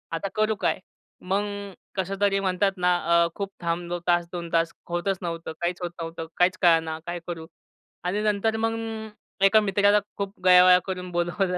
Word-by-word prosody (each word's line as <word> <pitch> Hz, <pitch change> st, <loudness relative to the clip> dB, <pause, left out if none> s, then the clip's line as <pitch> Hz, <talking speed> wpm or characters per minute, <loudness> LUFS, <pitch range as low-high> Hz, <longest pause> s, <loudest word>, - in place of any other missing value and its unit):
आता 180 Hz, +4 st, -3 dB
करू 215 Hz, 0 st, +2 dB
काय? -, -, +1 dB, 0.4 s
मग 195 Hz, +2 st, 0 dB
अ, 200 Hz, -1 st, -6 dB, 0.2 s
कसं 190 Hz, +1 st, -2 dB
तरी 195 Hz, -1 st, +3 dB
म्हणतात 195 Hz, +1 st, +1 dB
ना 180 Hz, 0 st, +3 dB, 0.3 s
अ, -, -, +2 dB
खूप 200 Hz, -1 st, -4 dB
थांबलो 175 Hz, +1 st, -2 dB
तास 175 Hz, -1 st, +3 dB
2 170 Hz, -1 st, -5 dB
तास. 165 Hz, 0 st, +2 dB, 0.2 s
होतच 180 Hz, +2 st, -1 dB
नव्हतं. 165 Hz, -2 st, -4 dB
काहीच 175 Hz, +1 st, -2 dB
होत 175 Hz, -1 st, -3 dB
नव्हतं, 165 Hz, 0 st, -5 dB
काहीच 180 Hz, +1 st, +3 dB
कळेना 165 Hz, -2 st, +3 dB
काय 175 Hz, 0 st, -3 dB
करू? 165 Hz, -2 st, -6 dB, 0.6 s
आणि 195 Hz, +4 st, -1 dB
नंतर 215 Hz, +1 st, +1 dB
मग 225 Hz, 0 st, +1 dB, 0.7 s
अ, -, -, +6 dB
एका 215 Hz, +2 st, +6 dB
मित्राला 205 Hz, +1 st, +3 dB, 0.2 s
खूप 200 Hz, 0 st, -5 dB
गयावया 180 Hz, 0 st, +8 dB
करून 180 Hz, -1 st, -4 dB
बोलावलं 175 Hz, +2 st, 0 dB
180 Hz, 175 wpm, -25 LUFS, 175-200 Hz, 0.7 s, गयावया